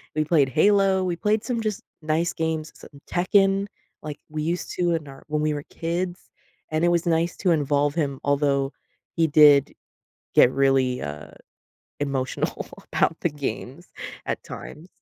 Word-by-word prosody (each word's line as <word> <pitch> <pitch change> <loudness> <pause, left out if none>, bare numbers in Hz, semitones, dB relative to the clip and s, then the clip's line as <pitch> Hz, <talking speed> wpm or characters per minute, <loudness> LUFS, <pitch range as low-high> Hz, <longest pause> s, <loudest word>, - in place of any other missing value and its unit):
We 155 0 +1
played 150 -4 +3
Halo. 195 +5 +3
We 175 -1 -1
played 210 +4 +1
some 245 -3 -1
just 215 -2 -2 0.2
nice 160 +2 0
games, 160 -2 -2
some 140 -1 -15
Tekken, 195 +2 +3 0.4
like 150 -1 -6
we 155 0 -3
used 170 +3 -2
to 175 -1 +1
in 155 -3 -5
our 135 -1 -12
when 150 0 -1
we 155 0 +1
were 145 - -6
kids, 175 +2 -3 0.4
and 155 +2 +1
it - - +4
was 170 0 +1
nice 165 +1 +1
to 185 - +1
involve 145 -1 +1
him, 140 -5 -1
although 140 -1 +1 0.4
he 165 - +3
did 145 -2 +6 0.6
get 125 - +7
really, 135 -2 +2
uh, 75 +1 -6 0.7
emotional 135 -2 -2 0.3
about 165 - +2
the 175 - +1
games, 140 - -6 0.4
at - - -3
times, 165 +4 -9
155 Hz, 160 wpm, -24 LUFS, 140-175 Hz, 0.7 s, get